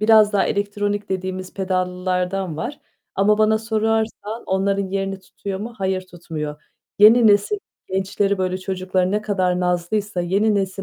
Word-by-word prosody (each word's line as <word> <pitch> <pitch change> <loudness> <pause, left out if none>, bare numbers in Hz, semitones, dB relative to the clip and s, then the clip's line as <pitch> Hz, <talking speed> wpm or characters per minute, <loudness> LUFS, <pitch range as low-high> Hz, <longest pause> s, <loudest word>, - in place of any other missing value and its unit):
biraz 215 -1 +6
daha 200 - +3
elektronik 205 0 -1
dediğimiz 185 0 -4
pedallılardan 185 -1 -1
var 245 - -5 0.3
ama 210 +2 +3
bana 220 0 +4
sorarsan 220 0 -1
onların 195 +1 +1
yerini 195 0 -2
tutuyor 190 +1 -6
mu, 230 +3 -5
hayır, 190 -1 -1
tutmuyor. 155 -3 -6 0.4
Yeni 225 +3 +8
nesil 205 - +4 0.3
gençleri, 195 +1 0
böyle, 185 0 -1
çocukları 185 -1 -1
ne 210 +1 0
kadar 185 -4 0
nazlıysa 180 +2 -1
yeni 200 +5 +2
nesil 195 -1 -1
195 Hz, 140 wpm, -21 LUFS, 185-210 Hz, 0.4 s, Yeni